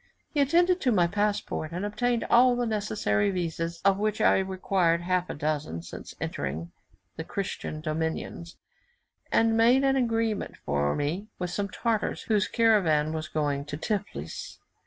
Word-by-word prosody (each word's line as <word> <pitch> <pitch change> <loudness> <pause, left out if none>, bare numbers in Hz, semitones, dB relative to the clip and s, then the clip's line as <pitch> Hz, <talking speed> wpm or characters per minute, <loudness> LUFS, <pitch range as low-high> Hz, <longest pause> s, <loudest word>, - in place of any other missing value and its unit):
He 295 - 0
attended 350 +6 +3
to 255 - +2
my 180 -6 +4
passport, 205 -4 -1
and 180 +4 -3
obtained 235 +3 0
all 245 +1 +5
the 245 0 0
necessary 210 -1 0
vises, 170 -2 -3
of 195 0 +4
which 215 0 0
I - - +4
required 185 -3 +1
half 180 0 0
a - - -4
dozen 145 - -2
since - - -9
entering 80 +5 -4 0.5
the 160 - -3
Christian 165 -4 -4
dominions, 160 +2 -3 0.7
and 225 0 +3
made 240 +4 +5
an 270 0 +3
agreement 230 -4 0
for 70 0 0
me 165 +8 -2
with 180 -1 -3
some 200 +1 -2
Tartars, 225 +1 -1
whose 210 -3 +1
caravan 175 -10 +3
was 155 -1 -3
going 145 -2 -1
to 145 - -5
Tiflis. 205 +4 -4
190 Hz, 155 wpm, -27 LUFS, 160-225 Hz, 0.7 s, all